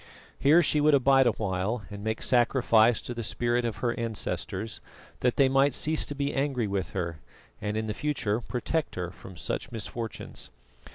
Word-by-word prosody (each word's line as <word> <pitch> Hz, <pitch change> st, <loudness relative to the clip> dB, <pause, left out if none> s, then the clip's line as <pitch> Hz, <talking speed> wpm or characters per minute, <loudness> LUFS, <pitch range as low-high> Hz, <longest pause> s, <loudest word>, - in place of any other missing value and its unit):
Here 160 Hz, +5 st, +6 dB
she 150 Hz, -1 st, +2 dB
would 150 Hz, 0 st, +5 dB
abide 135 Hz, -1 st, +5 dB
awhile 105 Hz, 0 st, -1 dB
and 100 Hz, 0 st, -7 dB
make 110 Hz, 0 st, -2 dB
sacrifice 120 Hz, -2 st, +4 dB
to 120 Hz, -, -5 dB
the 120 Hz, -, -4 dB
spirits 120 Hz, +2 st, 0 dB
of 110 Hz, -4 st, -4 dB
her 120 Hz, -, +2 dB
ancestors, 110 Hz, -2 st, -3 dB, 0.4 s
that 125 Hz, -1 st, +1 dB
they 135 Hz, -, +5 dB
might 135 Hz, 0 st, +3 dB
cease 155 Hz, +1 st, 0 dB
to 145 Hz, -, -4 dB
be 140 Hz, 0 st, -1 dB
angry 135 Hz, -4 st, 0 dB
with 100 Hz, -2 st, -2 dB
her 85 Hz, -4 st, -3 dB, 0.4 s
and 105 Hz, +1 st, -2 dB
in 110 Hz, -1 st, -2 dB
future 120 Hz, -5 st, -1 dB
protect 135 Hz, +7 st, -2 dB
her 90 Hz, -1 st, -3 dB
from 95 Hz, -1 st, -12 dB
such 110 Hz, -, -4 dB
misfortunes. 115 Hz, +1 st, -6 dB
120 Hz, 170 wpm, -28 LUFS, 105-135 Hz, 0.4 s, Here